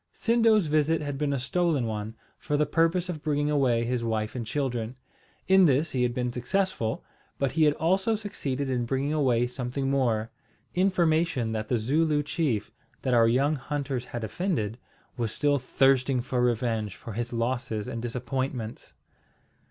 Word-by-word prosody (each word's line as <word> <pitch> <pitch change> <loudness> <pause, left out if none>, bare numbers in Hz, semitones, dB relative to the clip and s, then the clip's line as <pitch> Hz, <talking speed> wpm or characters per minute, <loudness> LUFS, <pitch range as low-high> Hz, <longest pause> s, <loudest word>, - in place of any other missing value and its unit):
Sindo's 225 -4 +3
visit 155 +1 +2
had 145 -2 -4
been 150 -1 0
a 140 - 0
stolen 150 +1 0
one, 110 0 -4 0.2
for 150 -1 -1
the 150 - +3
purpose 165 +4 +1
of 165 -5 -5
bringing 145 -1 0
away 125 -5 +2
his 120 0 -1
wife 110 -1 -1
and 115 -3 -4
children. 120 -3 -2 0.5
In 190 0 +6
this 150 +2 +2
he 130 - -1
had 125 -1 +2
been 125 0 -2
successful; 125 - -1 0.3
but 140 -2 0
he 160 -2 +3
had 150 -1 +3
also 190 +7 +1
succeeded 145 -10 -3
in 125 -2 0
bringing 135 +4 0
away 125 -6 +2
something 125 +2 -3
more, 115 -5 +1 0.4
information 170 - +2
that 110 -1 -3
the 120 - +1
Zooloo 145 +6 +1
chief, 145 - -1 0.3
that 130 - +1
our 115 -1 +5
young 135 +6 +3
hunters 135 -2 -3
had 120 -2 -6
offended, 115 - -2 0.4
was 115 -3 -1
still 145 +3 +1
thirsting 130 0 +2
for 125 0 -1
revenge 115 -4 0
for 115 - -9
his 120 +2 -3
losses 120 -2 -2
and 115 - -4
disappointments. 125 -1 -4
130 Hz, 165 wpm, -27 LUFS, 120-150 Hz, 0.5 s, In